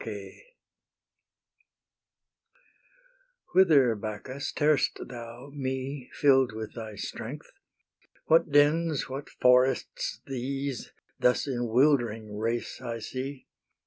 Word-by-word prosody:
Whither, 155 Hz, -10 st, +6 dB
Bacchus, 110 Hz, +6 st, -5 dB
tear'st 150 Hz, -1 st, +2 dB
thou 120 Hz, +2 st, -9 dB
me, 130 Hz, -1 st, -4 dB
Fill'd 135 Hz, -4 st, +4 dB
with 110 Hz, 0 st, -6 dB
thy 110 Hz, -3 st, -7 dB
strength? -, -, -7 dB, 0.7 s
What 165 Hz, 0 st, +4 dB
dens, 150 Hz, +1 st, +3 dB
what 135 Hz, +2 st, -6 dB
forests 125 Hz, +1 st, +2 dB
these, 135 Hz, 0 st, -4 dB, 0.3 s
Thus 125 Hz, -, +3 dB
in 120 Hz, -3 st, -1 dB
wildering 115 Hz, -4 st, +2 dB
race 115 Hz, +4 st, -2 dB
I 120 Hz, -2 st, -4 dB
see? 130 Hz, +4 st, -6 dB
130 Hz, 85 wpm, -28 LUFS, 115-140 Hz, 0.7 s, Whither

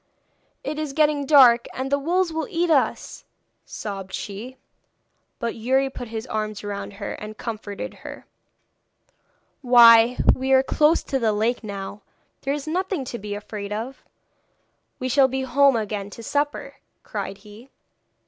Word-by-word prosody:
'It 305 Hz, -, -4 dB
is 305 Hz, -3 st, -4 dB
getting 295 Hz, -2 st, +2 dB
dark, 250 Hz, -5 st, +6 dB
and 265 Hz, +1 st, -4 dB
the 280 Hz, -, +2 dB
wolves 345 Hz, +3 st, 0 dB
will 320 Hz, 0 st, -2 dB
eat 345 Hz, -3 st, 0 dB
us,' 285 Hz, -4 st, 0 dB, 0.4 s
sobbed 195 Hz, -3 st, -7 dB
she. 225 Hz, +6 st, -6 dB, 0.8 s
But 235 Hz, -1 st, -3 dB
Youri 265 Hz, +4 st, 0 dB
put 245 Hz, -, -7 dB
his 220 Hz, +1 st, -5 dB
arms 215 Hz, -3 st, -4 dB
round 205 Hz, 0 st, -5 dB
her 200 Hz, 0 st, -6 dB
and 215 Hz, +1 st, -9 dB
comforted 215 Hz, -3 st, -6 dB
her. -, -, -9 dB, 1.4 s
'Why 235 Hz, -1 st, +7 dB, 0.2 s
we 265 Hz, +1 st, 0 dB
are 265 Hz, 0 st, +6 dB
close 300 Hz, +4 st, +2 dB
to 270 Hz, -, -2 dB
the 225 Hz, -3 st, +2 dB
lake 225 Hz, +4 st, 0 dB
now. 200 Hz, 0 st, -7 dB, 0.4 s
There 275 Hz, -, -1 dB
is 295 Hz, 0 st, -7 dB
nothing 360 Hz, -2 st, -2 dB
to 240 Hz, -1 st, -6 dB
be 205 Hz, 0 st, -5 dB
afraid 205 Hz, 0 st, -7 dB
of! 230 Hz, +6 st, -5 dB, 0.9 s
We 255 Hz, -, -3 dB
shall 265 Hz, +1 st, +4 dB
be 265 Hz, 0 st, -3 dB
home 275 Hz, +1 st, +4 dB
again 210 Hz, -2 st, -3 dB
to 230 Hz, -, -9 dB
supper,' 290 Hz, +4 st, -2 dB, 0.3 s
cried 195 Hz, -, -5 dB
he. 215 Hz, +5 st, -14 dB
245 Hz, 150 wpm, -23 LUFS, 215-280 Hz, 1.4 s, Why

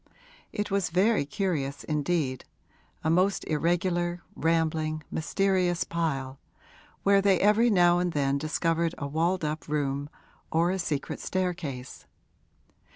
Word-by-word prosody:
It 205 Hz, -1 st, -3 dB
was 195 Hz, -2 st, +1 dB
very 185 Hz, -2 st, +2 dB
curious 145 Hz, -6 st, -2 dB
indeed 150 Hz, -3 st, -1 dB, 0.6 s
a 160 Hz, -, +1 dB
most 185 Hz, +4 st, +2 dB
irregular, 175 Hz, +2 st, 0 dB
rambling, 160 Hz, -1 st, 0 dB
mysterious 180 Hz, +1 st, +1 dB
pile, 140 Hz, -6 st, -2 dB, 0.6 s
where 200 Hz, 0 st, +5 dB
they 195 Hz, -2 st, +3 dB
every 215 Hz, +4 st, +4 dB
now 175 Hz, -4 st, +5 dB
and 180 Hz, 0 st, 0 dB
then 140 Hz, -2 st, +1 dB
discovered 165 Hz, +2 st, 0 dB
a 145 Hz, -, -4 dB
walled 165 Hz, +4 st, 0 dB
up 150 Hz, +1 st, -3 dB
room 145 Hz, -1 st, -1 dB, 0.4 s
or 170 Hz, +2 st, +2 dB
a 190 Hz, -, -2 dB
secret 150 Hz, -5 st, -3 dB
staircase. 170 Hz, -9 st, -4 dB
165 Hz, 120 wpm, -28 LUFS, 150-185 Hz, 0.6 s, where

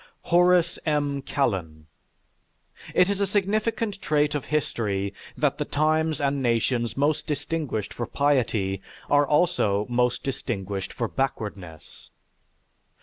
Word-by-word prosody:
HORACE 180 Hz, 0 st, +3 dB
M. 145 Hz, -2 st, 0 dB
KALLEN 90 Hz, -, -2 dB, 1.1 s
It 180 Hz, -, +5 dB
is 200 Hz, 0 st, -1 dB
a 200 Hz, -, +2 dB
significant 210 Hz, +1 st, 0 dB
trait 150 Hz, -1 st, +2 dB
of 145 Hz, -3 st, -2 dB
history 100 Hz, -9 st, -1 dB, 0.2 s
that -, -, +1 dB
the -, -, +1 dB
times 155 Hz, +1 st, +1 dB
and 140 Hz, -1 st, 0 dB
nations 120 Hz, 0 st, 0 dB
most 145 Hz, +2 st, +1 dB
distinguished 145 Hz, -7 st, -2 dB
for 120 Hz, -, -4 dB
piety 115 Hz, -9 st, +1 dB, 0.3 s
are 145 Hz, 0 st, +5 dB
also 105 Hz, -, +2 dB
most 125 Hz, 0 st, +1 dB
distinguished 100 Hz, -7 st, -3 dB
for 115 Hz, -, -2 dB
backwardness. 105 Hz, -, -5 dB
140 Hz, 115 wpm, -25 LUFS, 110-155 Hz, 1.1 s, It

